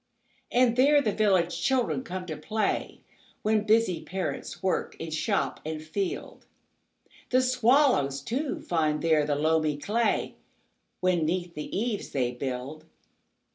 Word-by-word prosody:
And 245 -1 +3
there 290 +3 +6
the 225 -7 +1
village 185 -5 +2
children 255 +4 +1
come 185 -4 -5
to 160 -3 -5
play, 210 +9 -2 0.4
When 215 0 +2
busy 220 -5 +3
parents 190 0 -5
work 190 - -1
in 165 0 -6
shop 195 +6 -1
and 155 0 -4
field. 175 +5 -4 0.8
The 255 - +4
swallows, 250 - +3
too, 260 - -3
find 155 -3 0
there 155 -3 +3
the 145 - +1
loamy 155 0 +1
clayWhen 225 +9 0 0.7
'neath 175 0 +1
the 150 +3 -5
eaves 220 0 -2
they 125 -3 0
build. 130 +4 -5
180 Hz, 130 wpm, -27 LUFS, 155-225 Hz, 0.8 s, there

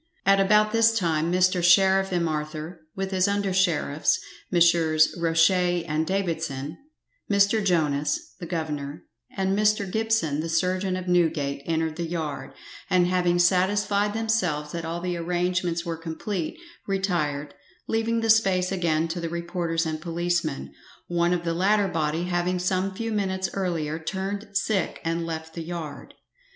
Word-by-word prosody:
At 195 0 +5
about 210 +2 +4
this 225 0 +4
time 165 -4 0
Mr 185 0 +2
Sheriff 190 +2 +5
M'Arthur, 155 -1 -3
with 195 0 -3
his 185 0 +2
under 200 -1 0
sheriffs, 170 -5 +1 0.3
Messrs 165 -3 +4
Roche 165 0 +3 0.3
and 155 +1 -1
Davidson 160 -6 -2 0.5
Mr. 200 +1 +3
Jonas, 150 -6 0
the 175 - -6
governor; 150 -3 -4 0.3
and 190 0 +1
Mr. 210 -1 +2
Gibson, 220 -8 0
the 165 +1 -3
surgeon 185 +3 0
of 185 0 -5
Newgate, 160 -6 +1
entered 160 -1 -1
the 170 -1 -2
yard, 155 -5 -4 0.4
and 180 -1 +4
having 175 -1 +2
satisfied 200 +3 +2
themselves 185 -10 0
that 170 -1 -4
all 165 +1 -4
the 180 -1 -2
arrangements 175 0 -1
were 165 -1 -3
complete, 165 - -4 0.3
retired, 155 -7 -1 0.3
leaving 225 +1 0
the 225 - -1
space 190 -5 +3
again 165 -4 +1
to 170 +2 -4
the 165 -1 -3
reporters 170 0 -2
and 155 -1 -3
policemen, 170 - -2 0.4
one 175 0 +1
of 175 -1 0
the 170 -1 -1
latter 200 +4 +2
body 160 -1 -1
having 180 0 0
some 185 +2 0
few 225 +2 -3
minutes 190 -3 -1
earlier 165 -5 -2
turned 195 +5 -4
sick 200 -3 -1
and 165 0 -1
left 160 0 -5
the 170 - -5
yard. 165 -2 -7
175 Hz, 145 wpm, -25 LUFS, 160-190 Hz, 0.5 s, At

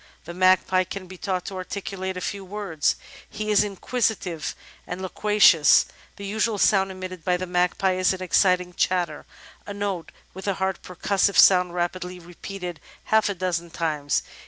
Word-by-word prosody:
The 170 - -7
Magpie 185 +1 +3
can 185 +1 -7
be 185 0 -12
taught 185 -3 -2
to 195 - -6
articulate 190 0 -5
a - - -5
few 200 +2 -4
words; 190 -6 -1 0.3
he 215 0 -3
is 210 - +5
inquisitive 200 -5 -2 0.3
and 180 - -5
loquacious. 190 -5 +5 0.3
"The 200 - -8
usual 215 +2 0
sound 195 -1 +3
emitted 185 -2 -7
by 180 +1 +1
the 185 - -4
magpie 180 +1 +1
is 185 0 +3
an 185 -1 -4
excited 180 -1 +2
chatter 175 -5 0 0.2
— - - -24
^a 205 - -6
note 200 -4 -3 0.2
with 190 +2 -8
a 200 - +1
hard 190 0 -2
percussive 195 +2 0
sound 180 -2 +6
rapidly 180 +1 -3
repeated 175 0 -8 0.2
half 220 -1 +2
a 200 - -2
dozen 175 -2 -2
times. 155 -4 -1
185 Hz, 165 wpm, -24 LUFS, 180-195 Hz, 0.3 s, sound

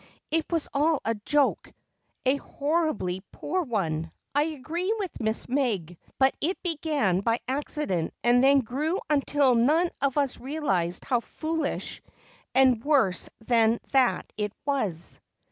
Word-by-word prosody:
"It 320 +1 0
was 330 -2 0
all 300 +1 +2
a 225 - +2
joke, 275 +7 0 0.5
a 265 +2 +3
horribly 285 - -1
poor 365 +5 -2
one, 165 - -2 0.2
I 290 +1 +3
agree 325 +5 -3
with 390 -6 -5
Miss 220 0 -1
Meg. 225 - -1 0.2
But 265 0 +4
it 355 +6 0
began 300 - +1
by 230 +3 +1
accident 265 - -1
and 245 +1 +5
then 275 0 +6
grew 295 - -1
until 285 -2 +3
none 305 +9 +3
of 275 0 +1
us 280 -3 0
realized 240 - -1
how 250 -3 +2
foolish 315 +4 -3 0.5
and 255 -4 +5
worse 270 - +2 0.2
than 230 -1 +3
that 265 -3 +3
it 210 -1 -2
was. 205 - -1
270 Hz, 135 wpm, -27 LUFS, 220-300 Hz, 0.5 s, then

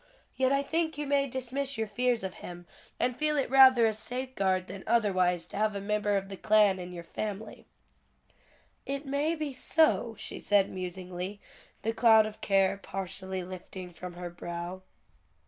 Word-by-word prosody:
Yet 260 0 +2
I 275 0 +2
think 320 +1 -1
you 295 - -2
may 280 0 +2
dismiss 260 +1 -2
your 220 - 0
fears 240 +1 0
of 190 -1 -4
him, 175 0 -8 0.3
and 250 0 +1
feel 300 +2 0
it 275 - 0
rather 260 -3 +8
a 220 - +2
safeguard 215 -5 -2
than 195 0 -8
otherwise 185 -6 +2
to - - -7
have 215 0 +1
a - - -2
member 210 0 0
of 195 0 -3
the 195 0 -8
Klan 210 -2 +4
in 180 0 -7
your 175 -1 -7
family." 210 +4 -6 1.2
"It 275 +1 -4
may 285 +4 0
be 305 -3 -3
so," 260 -5 +2
she - - -6
said, 200 -2 +3
musingly, 185 +1 -5 0.4
the 225 - 0
cloud 225 -1 +6
of 215 0 -8
care 195 -1 +3
partially 190 -1 -4
lifting 185 0 -8
from 180 +1 -8
her 175 0 -7
brow. 175 +1 -6
210 Hz, 170 wpm, -29 LUFS, 185-260 Hz, 1.2 s, rather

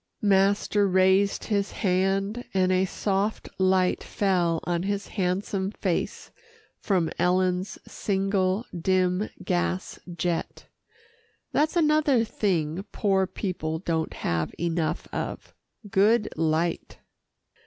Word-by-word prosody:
Master 200 +1 +3
raised 190 +1 +3
his 200 -2 -1
hand, 195 +4 0
and 185 -1 +3
a 185 +1 +3
soft 200 +2 -1
light 185 -1 +2
fell 175 -5 +1
on 175 -1 -1
his 200 +1 -2
handsome 190 0 -1
face 190 -4 -3 0.5
from 180 -6 0
Ellen's 185 +2 +1
single, 195 +1 0
dim 185 +3 +1
gas 85 +1 -1
jet 170 0 -3 0.9
That's 310 +3 +1
another 300 -6 +3
thing 180 -6 -1
poor 195 -2 +1
people 180 -4 -3
don't 160 -2 -2
have 85 -1 -2
enough 170 -1 -1
of - - -5 0.3
good 210 +3 +3
light. 160 +1 -1
190 Hz, 100 wpm, -26 LUFS, 175-200 Hz, 0.9 s, Master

